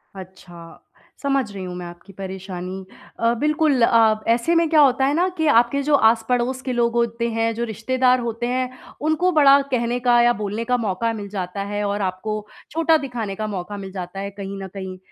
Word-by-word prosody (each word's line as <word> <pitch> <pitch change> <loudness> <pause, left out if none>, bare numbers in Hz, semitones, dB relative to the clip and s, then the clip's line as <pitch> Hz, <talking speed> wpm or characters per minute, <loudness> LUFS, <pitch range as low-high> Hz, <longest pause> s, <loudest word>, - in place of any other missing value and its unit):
अच्छा, 180 -3 -12 0.4
समझ 275 -6 0
रही 195 -2 -7
हूँ 180 -1 -6
मैं 180 0 -6
आपकी 175 +3 -12
परेशानी। 190 -1 -7 0.3
अ, 230 0 +2
बिल्कुल 300 -3 +2
अ, 225 -2 +4
ऐसे 245 +9 +2
में 335 0 +3
क्या 315 -1 +4
होता 265 -1 +4
है 280 - +1
ना 350 +4 +2
कि 320 - +1
आपके 245 +1 +3
जो 295 +1 +3
आस-पड़ोस 240 +2 +2
के 255 -1 -3
लोग 235 -1 +1
होते 235 0 0
हैं, 225 0 0
जो 235 - -2
रिश्तेदार 250 +3 +1
होते 235 0 -3
हैं, 255 +1 -1 0.3
उनको 315 +4 +1
बड़ा 280 -3 +6
कहने 240 0 0
का 245 -1 +4
या 240 0 +4
बोलने 210 +1 -3
का 250 +1 +1
मौका 225 0 -1
मिल 205 -2 -6
जाता 195 0 -4
है 205 +1 -3
और 205 +1 -2
आपको 205 +3 -3 0.3
छोटा 325 0 +3
दिखाने 240 -8 -4
का 215 +2 -3
मौका 205 0 -5
मिल 195 -1 -7
जाता 185 0 -6
है, 200 0 -4
कहीं 200 0 -7
न - - -6
कहीं। 190 -2 -6
230 Hz, 200 wpm, -22 LUFS, 195-255 Hz, 0.4 s, बड़ा